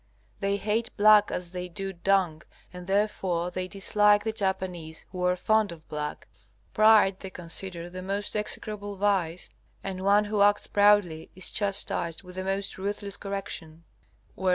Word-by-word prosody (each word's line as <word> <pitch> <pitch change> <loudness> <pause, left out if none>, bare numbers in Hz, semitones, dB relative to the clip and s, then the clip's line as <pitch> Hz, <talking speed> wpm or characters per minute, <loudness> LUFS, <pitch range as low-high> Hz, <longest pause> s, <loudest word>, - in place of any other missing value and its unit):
They 200 0 0
hate 220 +3 -1
black 210 0 +6
as 175 -1 -5
they 180 0 -5
do 195 +3 -5
dung, 180 -3 +1 0.3
and 180 0 -9
therefore 190 -4 0
they 185 +1 -3
dislike 205 +2 +3
the 220 - -1
Japanese, 190 -6 -3
who 180 -1 -4
are 180 0 +3
fond 215 +2 +2
of 160 -2 -12
black. 150 0 -5 0.5
Pride 215 -3 +5
they 190 - -7
consider 175 0 -3
the 185 +1 -8
most 200 +3 -3
execrable 210 -1 -2
vice, 185 -4 0 0.4
and 190 -1 -5
one 200 +2 +4
who 210 -1 -1
acts 205 0 +4
proudly 205 -6 +3
is 185 - -2
chastised 195 -5 0
with 180 0 -12
the 185 +1 -4
most 195 0 -2
ruthless 200 0 -2
correction. 190 -5 -5
195 Hz, 155 wpm, -27 LUFS, 180-205 Hz, 0.5 s, black